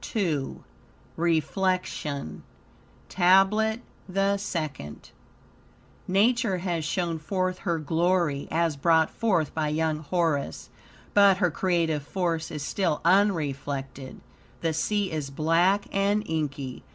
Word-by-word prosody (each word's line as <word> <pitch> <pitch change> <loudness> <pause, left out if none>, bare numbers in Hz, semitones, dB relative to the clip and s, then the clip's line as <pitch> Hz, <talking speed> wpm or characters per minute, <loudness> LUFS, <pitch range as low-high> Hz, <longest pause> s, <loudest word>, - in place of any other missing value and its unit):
II 160 -10 -1 0.5
REFLECTION 165 - -1 0.7
TABLET 195 +5 +3 0.3
THE 195 +2 +1
SECOND 155 - -5 1.0
Nature 215 +1 +2
has 175 -3 -2
shown 170 +1 -2
forth 185 +3 -2
her 170 -4 -1
glory, 160 -1 0
as 165 -2 +1
brought 160 +2 +3
forth 190 -10 0
by 155 -1 -1
young 155 0 0
Horus, 155 - -2 0.4
but 200 -2 +6
her 180 -3 +1
creative 165 -4 0
force 165 +1 -2
is 150 -2 -5
still 175 -2 -1
unreflected. 140 -8 0 0.4
The 165 -1 0
sea 205 +4 0
is 150 -3 -3
black 170 +7 +2
and 200 +2 +1
inky. 140 -5 -3
170 Hz, 105 wpm, -26 LUFS, 150-190 Hz, 1.0 s, but